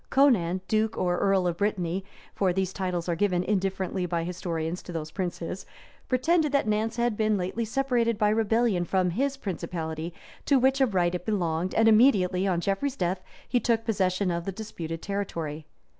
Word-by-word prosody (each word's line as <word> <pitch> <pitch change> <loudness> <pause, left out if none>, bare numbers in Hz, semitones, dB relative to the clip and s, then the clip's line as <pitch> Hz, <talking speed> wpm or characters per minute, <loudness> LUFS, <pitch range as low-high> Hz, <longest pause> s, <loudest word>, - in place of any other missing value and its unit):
Conan, 190 -11 +3
duke 220 0 +1
or 175 -1 +1
earl 195 -2 +2
of 175 -1 0
Brittany 190 -2 -1 0.3
(for 190 -2 +1
these 190 +1 -1
titles 180 -3 -2
are 170 - 0
given 180 -1 +1
indifferently 190 -2 -1
by 170 -1 -1
historians 170 -1 -3
to - - -9
those 155 -2 -5
princes) 180 0 -4 0.5
pretended 300 +4 +2
that 280 - +3
Nantz 215 +1 0
had 240 -2 +1
been 215 -1 +1
lately 190 +5 -2
separated 240 -2 +1
by 210 -1 +3
rebellion 220 -3 +2
from 180 0 +1
his 275 +8 -1
principality, 165 - -4 0.4
to 280 - +5
which 265 +2 +3
of 235 -7 +2
right 175 -1 +2
it 180 -1 -3
belonged; 180 -3 -1
and 225 0 +4
immediately 200 -5 +4
on 175 -3 +1
Geoffrey's 200 +9 -1
death, 180 +1 -1 0.3
he 245 - +2
took 230 -2 +1
possession 190 -3 +1
of 170 0 -3
the 195 - -2
disputed 170 -6 -6
territory. 165 -6 -4
190 Hz, 175 wpm, -27 LUFS, 175-225 Hz, 0.5 s, to